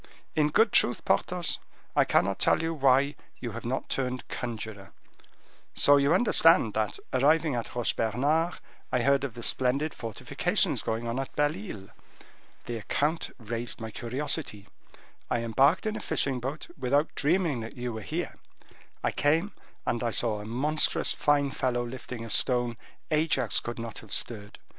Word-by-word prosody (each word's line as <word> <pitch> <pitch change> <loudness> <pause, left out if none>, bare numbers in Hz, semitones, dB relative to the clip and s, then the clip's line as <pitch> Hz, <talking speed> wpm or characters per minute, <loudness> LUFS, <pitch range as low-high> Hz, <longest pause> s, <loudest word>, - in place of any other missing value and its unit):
In 150 -1 +3
good 220 +7 +4
truth, 120 - +2
Porthos, 180 -2 +1 0.4
I - - +5
cannot - - +2
tell - - +4 0.2
why 140 -1 +3 0.2
you 120 - -5
have - - -7
not 130 +3 -2
turned 130 -1 -2
conjuror. 110 -5 -6 0.8
So 145 0 +6
you 140 +1 +3
understand 165 - +5
that, 110 -1 -1 0.2
arriving 150 +3 +3
at 120 -1 -4
Roche 120 -1 +1
Bernard, 145 +10 +1 0.4
I 125 - +1
heard 140 +1 +3
of 130 -5 -4
the 120 - -7
splendid 135 +7 +1
fortifications 115 -2 0
going 115 +1 -3
on 115 +3 -2
at 135 - -5
Belle 145 0 +2
Isle. 100 -1 -8 0.8
The 120 - -4
account 150 +8 -1
raised 120 0 -4
my 110 -1 -6
curiosity, 120 -2 -2 0.6
I 120 - 0
embarked 135 - +3
in 215 0 -1
a - - -4
fishing 135 -2 0
boat, 135 +6 -4
without 145 +5 +1
dreaming 160 -3 +1
that 115 +2 -8
you 120 -1 -3
were 110 - -5
here: - - -4 0.7
I - - +1
came, 160 +7 +1 0.3
and 120 0 -1
I 120 - +1
saw 110 -2 +1
a - - -8
monstrous 145 +7 +1
fine 145 -1 +2
fellow 125 -2 -1
lifting 120 -1 -7
a 115 - -5
stone 120 0 +3 0.4
Ajax 150 -6 +2
could 120 - -6
not 115 -1 -6
have 110 - -14
stirred. 105 -3 -4
125 Hz, 160 wpm, -28 LUFS, 115-145 Hz, 0.8 s, So